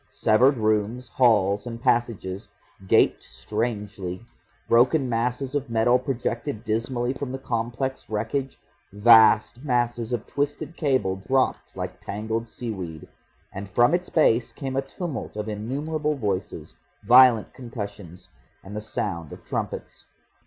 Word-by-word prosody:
Severed 125 +5 +3
rooms, 110 +3 0
halls 105 -5 +3
and 115 -1 -6
passages 115 -6 -1 0.4
gaped - - +4
strangely, 105 -3 -4 0.4
broken 130 +4 +4
masses 125 +3 -1
of 140 -3 -2
metal 115 +2 +3
projected 125 -1 -3
dismally 120 +3 -1
from 135 -1 -5
the 130 - -3
complex 120 +1 -3
wreckage, 115 +6 -2 0.3
vast 110 +3 +5
masses 120 -3 0
of 120 -3 -2
twisted 145 +3 -3
cable 130 - 0
dropped 130 +7 -1
like - - -5
tangled 110 +3 -4
seaweed, 95 -11 -6 0.5
and 100 +1 -7
from 120 - +3
its 180 +1 0
base 120 -7 +3
came 135 -3 -5
a 135 - +2
tumult 135 - -6
of 105 0 -4
innumerable 145 +8 -2
voices, 95 - -3 0.3
violent 120 0 +6
concussions, 100 -7 -8 0.4
and 100 +2 -9
the 105 - -3
sound 85 -7 -3
of - - -11
trumpets. - - -5
115 Hz, 125 wpm, -25 LUFS, 105-130 Hz, 0.5 s, violent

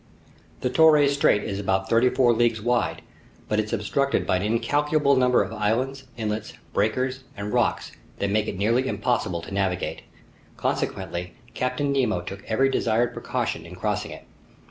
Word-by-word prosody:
The 125 - 0
Torres 150 -2 +5
Strait 140 -7 +3
is 100 -1 -3
about 95 -1 0
thirty 115 +2 +4
four 125 -2 +3
leagues 115 -1 +2
wide, 120 +3 0 0.4
but 105 - +1
it's 110 0 -2
obstructed 140 +7 0
by 95 - +2
an - - -3
incalculable 140 +7 +2
number 125 -3 +4
of 100 +3 -7
islands, 125 +6 -1
islets, 110 -1 -3 0.2
breakers, 130 +4 0
and 100 +1 -4
rocks - - +1 0.3
that 100 0 -1
make 105 +1 +1
it 100 - -4
nearly 115 +6 +2
impossible 105 -11 -1
to - - -9
navigate. 95 -2 -1 0.6
Consequently, 90 0 -3 0.2
Captain 140 +3 -1
Nemo 120 -9 +1
took 100 +3 -8
every 135 +5 +2
desired 120 -2 +1
precaution - - -3
in - - -10
crossing - - -2
it. - - -10
115 Hz, 160 wpm, -25 LUFS, 105-130 Hz, 0.6 s, Torres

